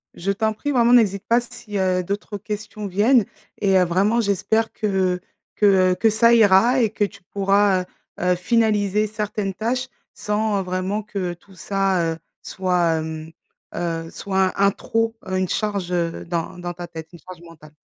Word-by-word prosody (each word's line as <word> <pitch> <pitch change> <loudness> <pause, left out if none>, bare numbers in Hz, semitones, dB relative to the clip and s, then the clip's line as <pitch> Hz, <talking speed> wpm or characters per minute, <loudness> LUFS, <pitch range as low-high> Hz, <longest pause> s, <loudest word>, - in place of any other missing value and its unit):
Je 195 +3 -1
t'en 220 +2 0
prie 290 +7 -3
vraiment 240 -2 +4
n'hésite 200 -5 +3
pas 235 +1 +4
si, 215 -3 -8
heu, 185 -1 +1
d'autres 205 +2 -4
questions 210 0 -6
viennent 215 +5 +3 0.3
et 195 -2 +3
heu, 185 - +5
vraiment 200 +7 +2
j'espère 205 +2 0
que 190 -3 0 0.4
que, 210 - +2 0.3
heu, - - +1
que 225 +4 +3
ça 230 +2 +4
ira 230 +4 +5
et 225 - +2
que 210 0 -2
tu 200 0 -4
pourras, 195 0 +2
heu, 180 - -7 0.4
heu, 180 0 +2
finaliser 210 +1 +1
certaines 210 -2 -3
tâches 250 +6 -2 0.3
sans, 210 -1 -1
heu, - - -2
vraiment 185 +3 -2
que 190 -4 -4
tout 190 +3 -19
ça, 190 -3 0
heu, - - -9 0.2
soit, 180 -3 0
hem, 160 0 -6 0.4
heu 165 -1 -3
soit 190 -1 -1
un 200 0 +5
trop, 225 +2 -2
heu, 185 0 -1
une 185 -1 -1
charge, 200 -4 -2
heu, 170 -2 -1
dans 170 +1 -3
dans 175 0 -5
ta 175 0 -8
tête, 160 -1 -9
une 175 - -13
charge 185 0 -12
mentale. 155 -3 -15
195 Hz, 180 wpm, -22 LUFS, 180-215 Hz, 0.4 s, heu